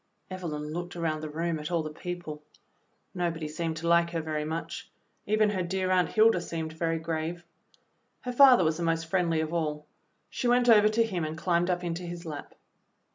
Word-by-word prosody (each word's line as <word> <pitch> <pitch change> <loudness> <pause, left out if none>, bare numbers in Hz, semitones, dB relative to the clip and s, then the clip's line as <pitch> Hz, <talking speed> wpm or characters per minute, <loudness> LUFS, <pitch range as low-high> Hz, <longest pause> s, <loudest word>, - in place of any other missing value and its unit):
Evelyn 155 -5 -5
looked 175 +1 -5
around 160 -3 -1
the 155 - -5
room 165 +1 -2
at 150 - -5
all 170 -2 0
the 155 - -5
people. 175 -3 -6 0.7
Nobody 170 -3 -2
seemed 160 +1 -3
to 165 +1 -4
like 170 0 +4
her 170 -1 -2
very 155 -1 -2
much; 160 +2 -5 0.4
even 215 0 +3
her 190 -3 -1
dear 185 +1 -1
Aunt 180 -1 +3
Hilda 220 -4 +4
seemed 160 -2 -4
very 165 0 -1
grave. 165 +1 -4 0.8
Her 250 - -4
father 255 -5 +7
was 160 -1 +1
the - - -5
most 165 0 0
friendly 165 -2 +1
of 160 +1 -3
all. 150 -3 -2 0.5
She 250 - -2
went 245 0 +3
over 215 -2 +7
to 225 +2 +3
him 190 -7 -2
and 155 +1 -4
climbed 175 0 +1
up 180 0 0
into 170 0 -3
his 175 0 -7
lap. 150 -3 -7
170 Hz, 195 wpm, -28 LUFS, 160-180 Hz, 0.8 s, father